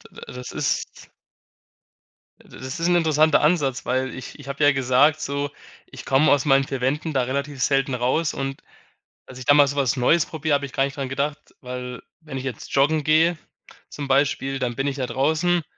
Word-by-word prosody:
D - - -10 0.2
das 125 0 -7
ist - - -3 1.3
äh, - - -21
das 130 +4 -7
ist 170 - +1
‘n 175 - +3
interessanter 155 -2 +3
Ansatz, 145 -5 +1
weil 130 +1 -1
ich 130 +3 -9
ich 140 - -12
habe 140 +2 -2
ja 145 - +6
gesagt, 135 +3 +3
so: 140 0 -2 0.4
„Ich - - -11
komme 135 +3 +3
aus 145 0 +3
meinen 135 -1 +4
4 135 -1 -5
Wänden 150 +5 -1
da 130 -2 +1
relativ 140 +2 -3
selten 135 -1 +1
raus“ 130 +6 0
und 135 0 -4 0.7
dass 130 - -11
ich 130 - -8
da 145 - +5
mal 145 -1 +6
so 140 +1 -4
was 135 -3 +1
Neues 155 +7 +3
probiere, 155 -1 -1
habe 140 0 0
ich 135 - -13
gar 135 - +1
nicht 140 +2 -4
dran 135 -2 -3
gedacht, 140 +3 -4
weil 125 -1 -7 0.2
wenn 150 -5 -7
ich 130 - -7
jetzt 125 -5 -6
joggen 150 +3 +3
gehe, 160 +2 +3 0.5
zum 145 -1 -6
Beispiel, 135 0 +1
dann 120 -2 -2
bin 135 +1 -1
ich 140 0 -2
ja 130 - -1
draußen 160 +6 +1
140 Hz, 205 wpm, -23 LUFS, 130-150 Hz, 1.3 s, ja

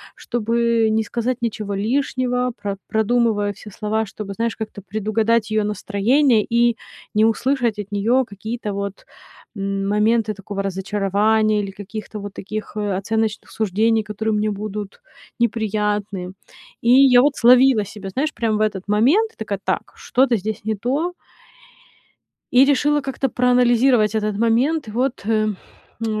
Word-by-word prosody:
чтобы 235 -1 0
не 220 0 +1
сказать 240 +3 -2
ничего 210 -3 -3
лишнего, 250 +2 0
про 200 -2 -3
продумываю 220 -2 +1
все 210 - -12
слова, 220 +2 -2
чтобы, 200 0 -7
знаешь, 230 +2 -2
как-то 215 -2 -7
предугадать 215 +3 0
ее 215 -1 +2
настроение 215 +5 +2
и 235 0 +3 0.4
не 215 +1 +5
услышать 235 -1 0
от 205 0 -6
неё 230 +6 +2
какие-то 215 +1 -5
вот, 200 0 -5 0.5
м, 195 0 -2
моменты 215 +1 +2
такого 200 0 -5
разочарования 205 +2 +1
или 195 - -5
каких-то 210 +2 -8
вот 200 0 -7
таких, 215 +2 -6
э, 205 -3 -1
оценочных 220 +2 -2
суждений, 220 +2 +1
которые 215 +1 -2
мне 210 0 0
будут 205 - -6 0.4
неприятны. 210 -4 -1 0.5
И 235 - +3
я 255 -2 +7
вот 285 +1 +2
словила 250 -2 +5
себя, 200 -1 -8
знаешь, 290 +10 -1
прям 220 -2 0
в - - -1
этот 205 -3 0
момент. 275 - +2
Такая: 205 -3 -4
"Так, - - -2
что-то 250 -2 +1
здесь 210 +1 -5
не 220 -1 0
то". 280 - -1 1.4
И 255 +2 +7
решила 290 +1 +2
как-то 270 0 -2
проанализировать 245 -2 +3
этот 210 -1 -1
момент. 235 +5 +1
Вот, 245 +3 -1
э, 215 -1 +1 0.5
м, 215 -1 -1
220 Hz, 140 wpm, -21 LUFS, 205-240 Hz, 1.4 s, я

